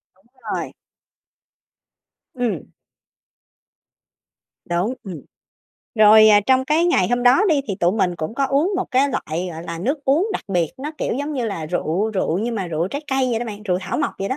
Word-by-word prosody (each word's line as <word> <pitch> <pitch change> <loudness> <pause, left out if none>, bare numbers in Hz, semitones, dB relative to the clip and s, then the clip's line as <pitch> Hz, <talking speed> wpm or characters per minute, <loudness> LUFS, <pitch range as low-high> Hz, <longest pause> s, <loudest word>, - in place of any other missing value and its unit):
Đúng 190 +3 -32 0.3
rồi. - - -4 1.6
Ừm. 235 - -3 2.0
Đúng, 175 +8 -1
ừm. 180 -6 -7 0.7
Rồi, 215 0 +7
ờ, 205 -1 +6
trong 260 0 +3
cái 305 +5 +2
ngày 185 - +2
hôm 245 +1 0
đó 250 +10 +5
đi, 295 -3 +3
thì 195 - -1
tụi 175 +2 +3
mình 180 -5 0
cũng 155 +8 -5
có 275 +1 +1
uống 285 +8 +1
một - - -2
cái 270 +2 +3
loại, 175 - -3
gọi 160 +1 -7
là, 170 -1 -6
nước 275 - -2
uống 310 +10 +2
đặc - - -4
biệt, 175 -5 0
nó 290 +3 -4
kiểu - - -1
giống 285 +4 -3
như 250 -3 -2
là 165 -7 -4
rượu 180 +5 -1
rượu 185 -4 -1
nhưng 230 +3 -2
mà 195 -4 -3
rượu 165 +2 -2
trái 285 +8 -5
cây 265 -1 +1
vậy 225 - 0
đó 240 - -3
bạn, 210 -1 -7
rượu 180 -4 0
thảo 190 0 -3
mộc - - 0
vậy 195 - -2
đó. 260 - -2
220 Hz, 200 wpm, -21 LUFS, 180-265 Hz, 2.0 s, Rồi